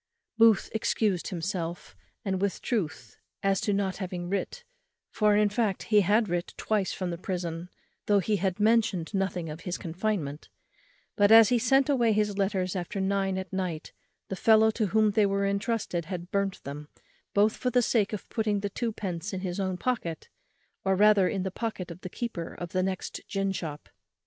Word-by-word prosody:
Booth 225 -2 +4
excused 210 -4 0
himself, 170 - -4 0.3
and 190 -1 -1
with 200 -1 0
truth, 195 -10 -3 0.3
as 195 -1 +2
to - - -2
his 200 - +1
not 195 -2 -1
having 180 -3 -4
writ; 200 - -3 0.5
for, 210 -1 +3
in 210 0 +4
fact, 205 -2 -1
he 210 -2 +4
had 210 +4 +3
writ 175 0 -3
twice 210 -4 0
from 185 -2 -3
the 170 - -5
prison, 175 -2 -4 0.4
though 205 - +4
he 205 +2 +1
had 190 +1 -1
mentioned 215 -5 +2
nothing 185 -3 -1
of 155 +1 -6
his 180 0 -3
confinement; 170 -4 -3 0.7
but, 205 +1 +4
as 225 -1 +9
he 245 - +3
sent 270 +3 +3
away 240 -6 +3
his 210 -1 +1
letters 195 -2 0
after 180 +2 -3
nine 195 0 0
at 190 0 -6
night, 180 -5 -3 0.3
the 190 - -4
fellow 220 +2 +5
to 215 -1 -1
whom 215 +2 +3
they 205 0 +3
were 200 0 0
entrusted 200 -4 -1
had 175 0 -6
burnt 200 -1 -1
them 145 +2 -7 0.5
both 210 +2 +4
for 250 - -1
the 245 0 +3
sake 220 -3 +2
of 210 - -5
putting 210 -3 -1
the 205 0 -3
twopence 205 -5 -3
in 185 - -3
his 185 0 -3
own 185 -2 -1
pocket, 180 -9 -3 0.5
or 190 0 +2
rather 205 -1 +5
in 190 - -2
the 190 - -3
pocket 195 -4 -4
of 170 +2 -10
the 185 - -6
keeper 190 -6 -5
of 175 - -6
the 185 - +1
next 185 0 -3
gin 195 -1 -1
shop. 155 -6 -5
195 Hz, 190 wpm, -28 LUFS, 180-215 Hz, 0.7 s, as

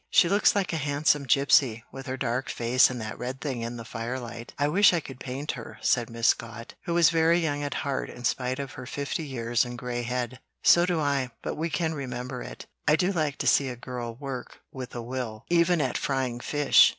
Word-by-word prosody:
"She - - +5
looks 200 +3 +4
like 195 -4 0
a - - 0
handsome 145 -1 +1
gypsy, 130 -3 +4
with 135 +1 -8
her 130 0 -3
dark 125 +1 -1
face 120 +2 +4
and 125 -1 -5
that 110 0 -6
red 130 +2 -4
thing 135 -6 -3
in 120 +1 -4
the 115 - -8
firelight. 115 0 -5
I 145 - +2
wish 190 +6 +5
I 170 - +2
could 135 -4 -10
paint 135 +4 -4
her," - - -9
said 120 -2 +2
Miss 115 0 +2
Scott, 115 0 -2
who 170 - -1
was 170 -1 +6
very 165 +1 +4
young 150 -4 0
at 145 -1 -3
heart 140 -1 -2
in 125 - -10
spite 125 +1 0
of 140 -2 -5
her 125 - -9
fifty 140 +3 -3
years 120 -4 0
and 120 -1 -6
gray 120 0 -3
head. 125 0 -3 0.2
"So 175 +1 +6
do 175 -3 +1
I, 140 -4 0
but - - -2
we 165 +2 -2
can 160 -1 0
remember 125 -3 -5
it. - - -8 0.2
I 150 - +6
do 180 +3 +1
like 155 -6 -1
to - - -3
see 135 -2 +4
a 125 - -5
girl 120 -1 -6
work 135 -1 -7
with 130 -2 -7
a 120 - -4
will, 120 -3 -5
even 170 0 +4
at - - 0
frying 130 -3 -1
fish. 145 +3 +5
130 Hz, 225 wpm, -27 LUFS, 120-150 Hz, 0.2 s, was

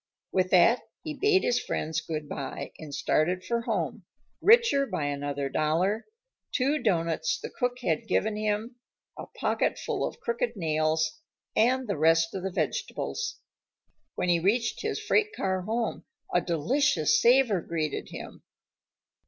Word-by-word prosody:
With 185 -1 +1
that, 185 +7 +5 0.2
he 310 - -4
bade 385 +4 +3
his 245 - +2
friends 160 +1 -2
good 155 -3 -5
by 140 -2 -5
and 155 -2 -8
started 155 +6 0
for 235 0 0
home, - - -2 0.4
richer 430 - +5
by 155 - -2
another 145 -1 -2
dollar, 165 - 0 0.4
two 285 +3 +1
doughnuts 165 -5 0
the - - -7
cook 245 0 -1
had 160 -6 0
given 215 0 +1
him, 215 +3 -2 0.4
a - - -8
pocket - - -1
full - - -2
of - - -4
crooked 470 +1 -1
nails, 160 -1 0 0.3
and 255 +3 +3
the 200 -7 -2
rest 165 +1 +4
of 190 - -3
the 190 - -2
vegetables. 415 - -2 0.8
When 180 - -1
he 170 -1 +4
reached 225 +6 +1
his - - -2
freight 430 0 +1
car 190 -1 -1
home 225 +5 -2 0.3
a - - +4
delicious 275 - +2
savor 240 -7 +4
greeted 155 -3 -3
him. - - -9
190 Hz, 145 wpm, -28 LUFS, 160-250 Hz, 0.8 s, that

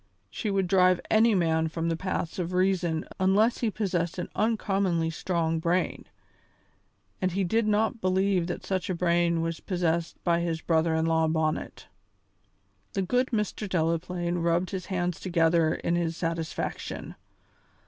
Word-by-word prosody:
She 215 - -3
would 195 -1 +1
drive 185 -1 +4
any 220 0 +5
man 160 -2 +2
from 165 +1 -3
the 165 - 0
paths 180 -1 -3
of 180 0 -3
reason 180 -3 +1
unless 200 +5 +3
he 235 - +1
possessed 180 -5 -2
an 175 - -4
uncommonly 195 -6 +1
strong 165 -1 -1
brain, 170 +3 0 1.2
and 185 -1 0
he 195 +1 0
did 220 +5 +1
not 220 +2 +1
believe 185 -1 +1
that 175 - -5
such 190 -2 -2
a 185 - 0
brain 170 -1 +2
was 165 -1 -3
possessed 170 -3 -1
by 170 -1 +2
his 170 -1 -1
brother 160 0 +1
in 160 0 +1
law 160 0 +2
Bonnet. 155 -1 -2 1.1
The 195 - 0
good 250 +7 +1
Mr. 210 -3 -2
Delaplaine 175 +1 -1
rubbed 170 +2 +1
his 185 -2 -5
hands 180 -3 -2
together 165 -2 +2
in 170 - -1
his 165 -1 -1
satisfaction. 165 -1 -4
175 Hz, 150 wpm, -27 LUFS, 165-190 Hz, 1.2 s, any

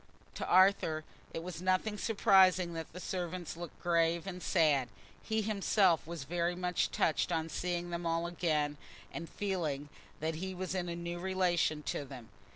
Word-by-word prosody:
To - - -4
Arthur 185 -4 +4 0.3
it 165 - -5
was 175 -1 -6
nothing 185 +3 +1
surprising 190 -5 +4
that 165 -1 -6
the 180 - -8
servants 180 -2 -4
looked 170 -1 -8
grave 170 0 +2
and 180 -2 -6
sad: 150 -9 +3 0.3
he 220 0 -1
himself 195 -5 +2
was 170 -4 -5
very 175 +4 -1
much 180 -1 0
touched 160 +2 +1
on 165 -1 0
seeing 175 +1 -2
them 170 0 -2
all 165 0 0
again, 155 -4 0 0.4
and 165 0 -6
feeling 160 -8 -2 0.3
that 160 +1 -1
he 190 0 -4
was 185 0 -3
in 180 -2 -2
a 170 - -3
new 170 0 -4
relation 175 -4 +1
to 145 - -2
them. 130 -5 -10
175 Hz, 165 wpm, -33 LUFS, 165-185 Hz, 0.4 s, Arthur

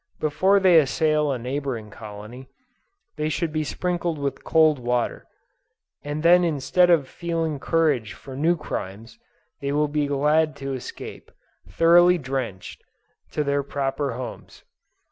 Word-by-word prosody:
Before 190 +6 +3
they 185 -4 +6
assail 155 +1 +1
a 130 - -1
neighboring 125 -3 -4
colony, 110 +5 -10 0.7
they 155 0 -1
should 155 0 -2
be 155 -1 0
sprinkled 175 +1 -2
with 140 -1 -4
cold 155 -3 +3
water, 120 0 -2 0.8
and 145 +1 -4
then 175 +1 +6
instead 165 +3 +2
of 160 -6 +3
feeling 165 -2 -3
courage 145 -10 +1
for 135 -2 -11
new 165 +5 +2
crimes, 115 - -7 0.4
they 140 0 -3
will 150 +1 +1
be 145 0 -1
glad 150 +2 +2
to 135 -1 -5
escape, 130 - -8 0.4
thoroughly 175 +2 +5
drenched, 130 - -5 0.5
to 150 - 0
their 140 0 0
proper 140 -1 -2
homes. 125 +1 -8
145 Hz, 135 wpm, -24 LUFS, 130-165 Hz, 0.8 s, they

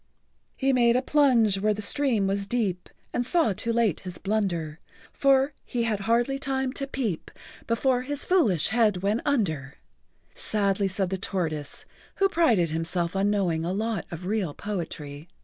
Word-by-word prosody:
"He 270 0 +1
made 240 -2 +4
a 255 - +2
plunge 245 -9 +3
where 210 +1 +1
the 210 - -5
stream 245 -4 +1
was 195 +1 -1
deep 200 -7 -1 0.2
And 245 - 0
saw 255 - +2
too 230 +5 -3
late 230 -7 +1
his 180 -2 -8
blunder, 180 -7 -2 0.3
For 275 0 +3
he 240 -2 -2
had 220 -3 0
hardly 235 +6 +1
time 265 -2 -1
to 275 -1 -3
peep 235 - -3 0.4
Before 245 +2 +1
his 285 +2 -4
foolish 230 - +2
head 210 -4 +2
went 210 +4 +1
under," 160 - 0 0.6
[Pg - - -25
89]sadly 200 -2 +1
said 190 -1 -1
the 190 - -1
tortoise, 160 -7 -3 0.3
who 390 0 +3
prided 230 - +3
himself 170 +2 -1
on 195 +1 +2
knowing 180 -6 0
a 170 - -1
lot 215 0 -2
of 170 +1 -7
real 195 -6 -1
poetry. 160 -6 -5
210 Hz, 165 wpm, -26 LUFS, 180-250 Hz, 0.6 s, made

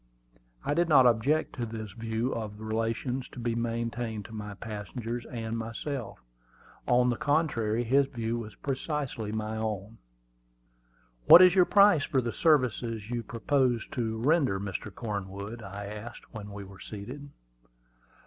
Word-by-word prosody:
I - - +1
did 170 +2 +2
not 135 -4 +7
object 125 +7 +2
to 120 -2 -2
his 110 -2 -6
view 115 +3 -2
of 105 -2 -5
the 110 - -10
relations 115 +4 -2
to - - -8
be 120 -1 -1
maintained 115 -2 -2
to 110 - -11
my 105 -1 -6
passengers 115 +3 -5
and 115 -2 -4
myself; 115 +2 -5 0.6
on 125 0 +4
the - - 0
contrary, 120 -7 +1
his 135 +4 +3
view 115 -2 -3
was 110 -2 -8
precisely 135 -5 -3
my 110 0 -3
own. 110 0 -4 1.3
"What 180 - +11
is 180 -1 +7
your 180 -2 +6
price 200 -7 +6
for 140 -4 +1
the 120 -3 -2
service 145 -8 +3
you 115 0 -4
propose 120 +1 +1
to 110 -2 -2
render, 135 - +2
Mr. 100 0 -5
Cornwood?" 100 +1 -5
I 100 0 -7
asked, 105 +5 -9
when 105 -2 -7
we 100 0 -7
were 95 0 -13
seated. 125 +8 -8
115 Hz, 150 wpm, -29 LUFS, 110-130 Hz, 1.3 s, What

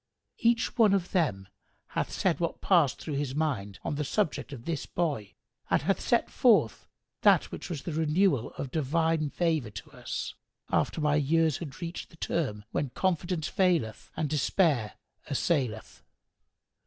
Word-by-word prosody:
Each 230 0 +2
one 210 -3 +6
of 185 -2 -2
them 105 - 0 0.4
hath - - -2
said 185 -4 +1
what 170 -1 -2
passed 170 -8 +3
through 155 - -5
his 140 -2 -2
mind 125 -11 -1
on - - -2
the 150 - 0
subject 160 -2 -1
of 125 -5 -8
this 160 -4 -3
boy 140 - -2 0.3
and - - +2
hath - - +1
set - - +2
forth - - +3 0.3
that - - +4
which - - -7
was 160 -6 -4
of - - -22
the 170 - -2
renewal 160 - +2
of 135 - -5
divine 160 +1 +1
favour 160 -8 0
to 100 -2 -10
us, - - -5 0.4
after - - +1
my 150 -1 +2
years 160 +1 +2
had 155 -1 -7
reached 170 +1 -5
the 165 - -18
term 105 -12 -2
when 140 - -1
confidence 175 0 -1
faileth 170 - +1
and 155 - 0
despair 145 - +1 0.4
assaileth. 135 -6 -1
155 Hz, 160 wpm, -29 LUFS, 135-170 Hz, 0.4 s, one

